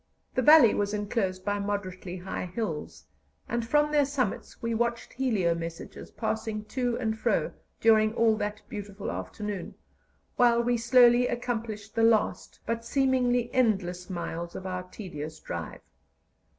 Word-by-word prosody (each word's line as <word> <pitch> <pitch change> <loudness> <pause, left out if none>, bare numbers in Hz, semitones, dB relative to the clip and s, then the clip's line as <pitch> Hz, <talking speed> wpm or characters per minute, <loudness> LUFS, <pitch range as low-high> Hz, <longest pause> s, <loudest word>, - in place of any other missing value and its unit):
The 255 - +1
valley 285 -4 +8
was 205 +1 0
enclosed 200 -3 -2
by 205 0 0
moderately 190 -3 -4
high 185 0 -5
hills, 160 - -5 0.4
and 235 0 -1
from 295 +5 +2
their 295 -1 +4
summits 265 -7 -3
we 230 0 -2
watched 235 +1 -1
helio 220 -10 +1
messages 165 0 -7
passing 220 -1 -3
to 245 -3 0
and 220 -3 -1
fro 220 - 0 0.3
during 220 0 +4
all 230 -2 +4
that 210 0 -4
beautiful 205 -3 -6
afternoon, 180 - -5 0.6
while 235 -1 +4
we 245 0 +2
slowly 240 +1 +5
accomplished 225 -4 -4
the 225 - 0
last, 225 -2 +2
but 230 +1 -2
seemingly 245 -1 +1
endless, 190 -7 +1
miles 170 -1 -5
of 190 - -7
our 185 -1 -3
tedious 160 -5 -8
drive. - - -6
220 Hz, 140 wpm, -28 LUFS, 185-240 Hz, 0.6 s, valley